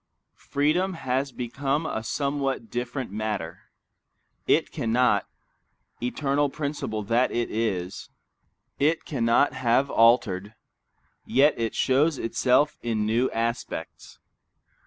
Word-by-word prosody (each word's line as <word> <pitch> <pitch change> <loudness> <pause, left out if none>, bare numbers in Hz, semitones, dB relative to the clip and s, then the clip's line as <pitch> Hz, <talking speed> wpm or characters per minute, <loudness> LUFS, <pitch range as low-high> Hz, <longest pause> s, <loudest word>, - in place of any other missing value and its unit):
Freedom 170 +7 +1
has 130 -2 -1
become 135 +5 -2
a 110 - -2
somewhat 135 -3 -2
different 125 0 -4
matter. 105 -6 -4 0.8
It - - +2
cannot, 115 -3 +1 0.7
eternal 140 +3 0
principle 140 -7 -3
that 115 +5 +2
it 120 0 -1
is, 95 -5 -2 0.7
it 155 +3 +1
cannot 120 -1 +2
have 130 +2 +1
altered, 110 -3 +3 0.7
yet 145 +3 +4
it 115 -2 -2
shows 140 +3 +2
itself 130 +5 +1
in 110 -3 -1
new 115 +4 +2
aspects. 115 +1 -4
125 Hz, 100 wpm, -26 LUFS, 115-140 Hz, 0.8 s, yet